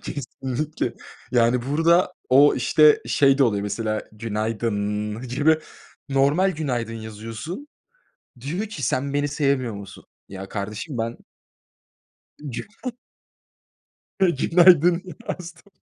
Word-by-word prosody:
Kesinlikle. 140 +2 -4 0.4
Yani 120 0 +3
burada 165 +5 +3 0.2
o, 140 +3 +6
işte, 150 +4 +4
şey 135 -1 +3
de 135 - +6
oluyor 100 -4 +1
mesela, 110 +1 -2
"günaydınnn" 105 -1 -2
gibi 150 +5 +3 0.5
normal 140 +8 +3
"günaydın" 125 -7 -2
yazıyorsun. 115 - -7 0.7
Diyor 165 - -3
ki 205 -10 -7
"sen 135 +4 -1
beni 145 0 +1
sevmiyor 140 -5 0
musun?" 100 -1 -10 0.3
Ya, 95 0 -8
kardeşim 110 +7 -5
ben 115 +1 -3 1.2
Güna 135 +2 -6 1.5
günaydın 175 +1 +5 0.3
yazdım. 180 +2 -7
135 Hz, 100 wpm, -23 LUFS, 115-155 Hz, 1.5 s, o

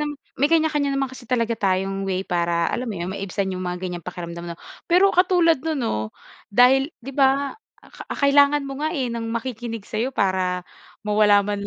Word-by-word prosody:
nam 300 0 -1 0.3
may 285 - +2
kanya-kanya 310 -3 +2
naman 275 -1 0
kasi 260 - -11
talaga 235 -1 0
tayong 195 0 0
way 190 -1 -1
para 170 -2 0
alam 250 - -2
mo 215 - -3
yun, 170 +1 -4
maibsan 195 0 -3
yung 185 0 -4
mga 180 0 -3
gan'yang 180 -3 -5
pakiramdaman 170 -1 -6
na. - - -31 0.3
Pero 365 +3 +5
katulad 350 -3 +4
non 320 -1 -1
'no, 235 - -1 0.6
dahil 265 +6 +5
'di 265 +3 -8
ba, 275 +2 +2 0.3
a - - -17
ka - - -10
kailangan 285 +1 +4
mo 275 0 -6
nga, 310 +3 -2
eh, 260 -5 -1
ng 230 -1 -4
makikinig 230 -2 -4
sa'yo 240 +5 -2
para 185 -3 0 0.4
mawala 210 -1 +4
man 200 0 -3
230 Hz, 190 wpm, -23 LUFS, 190-280 Hz, 0.6 s, Pero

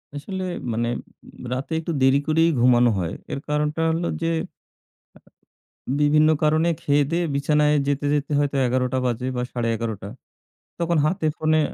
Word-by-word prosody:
আসলে 185 +6 -5 0.3
মানে 115 +1 -1 0.5
উম - - -12
রাতে 135 +5 -5
একটু 165 +1 -4
দেরি 135 +1 +5
করেই 165 +2 +3
ঘুমানো 120 0 +5
হয়। 85 +1 -3 0.2
এর 140 - -3
কারণটা 150 +2 0
হলো 170 +1 -1
যে 165 - 0 1.6
আ - - 0
বিভিন্ন 155 +1 +4
কারণে 160 +2 +3
খেয়ে-দেয়ে 145 +4 +1
বিছানায় 150 +1 +2
যেতে, 145 0 0
যেতে 145 0 -1
হয়তো 145 -1 0
১১ঃ০০ 125 +1 0
বাজে 125 +1 -1
বা, 125 - -1
১১ঃ৩০। 115 -4 -3 0.7
তখন 170 -1 +1
হাতে 160 +1 -1
ফোনে 155 0 +2
145 Hz, 145 wpm, -23 LUFS, 125-155 Hz, 1.6 s, দেরি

